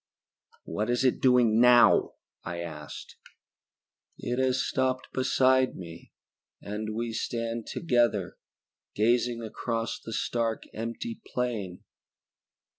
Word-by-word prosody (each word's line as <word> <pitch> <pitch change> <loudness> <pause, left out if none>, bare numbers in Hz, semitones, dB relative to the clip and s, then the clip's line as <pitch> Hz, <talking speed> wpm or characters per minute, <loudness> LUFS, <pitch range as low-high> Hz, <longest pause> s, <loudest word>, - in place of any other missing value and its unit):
"What 105 +3 -3
is 120 +2 +1
it 130 - +2
doing 125 -4 +4
now?" 125 -1 +6 0.3
I 85 +1 -5
asked. 75 -3 -8 1.0
"It 125 +1 -3
has 130 0 +1
stopped 130 -1 -1
beside 130 0 +3
me 85 -2 -10 0.5
and 105 +1 -5
we 115 0 -3
stand 115 0 -3
together, 120 - 0 0.6
gazing 120 +2 +1
across 115 +1 -3
the 115 - -7
stark, 115 0 -1
empty 115 - -5
plain. 110 -8 -2
115 Hz, 105 wpm, -28 LUFS, 110-125 Hz, 1.0 s, now